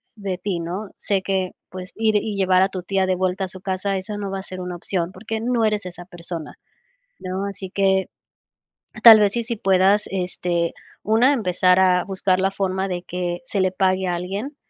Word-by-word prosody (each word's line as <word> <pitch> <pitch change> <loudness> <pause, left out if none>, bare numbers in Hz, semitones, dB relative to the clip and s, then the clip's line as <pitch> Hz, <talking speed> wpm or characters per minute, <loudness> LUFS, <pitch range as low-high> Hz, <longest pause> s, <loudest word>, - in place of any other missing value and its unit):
de 200 -4 -4
ti, 180 -1 -3
¿no?, 180 +5 -5
sé 195 -2 0
que, 190 -2 -1 0.2
pues, 185 0 -8
ir 220 -1 +1
y 210 0 -2
llevar 185 -1 +3
a 190 - +1
tu 185 -2 -6
tía 190 +1 +1
de 185 0 +1
vuelta 185 +1 -1
a - - -6
su 185 +1 -10
casa, 195 +1 -1
esa 200 +3 -5
no 200 -1 -4
va 195 - -3
a - - -7
ser 185 -1 -7
una 180 0 -5
opción, 175 0 -2
porque 220 +4 -5
no 235 -1 +1
eres 210 -2 0
esa 175 -1 -8
persona, 170 -3 -7 0.7
¿no?, 185 +2 -3
así 195 -1 -6
que 190 -1 +1 0.9
tal 225 -2 +11
vez, 205 -2 +3
sí, 235 - 0
sí 235 0 -3
puedas, 195 +1 +3
este, 180 -2 -1 0.3
una, 225 +6 +4
empezar 185 -6 +2
a 180 -1 +4
buscar 190 -1 0
la 190 +1 +2
forma 190 0 -1
de 180 -1 -3
que 180 -1 -4
se 205 -6 -2
le 185 -1 +2
pague 185 0 +1
a 175 - 0
alguien, 200 - -4
190 Hz, 210 wpm, -22 LUFS, 180-200 Hz, 0.9 s, tal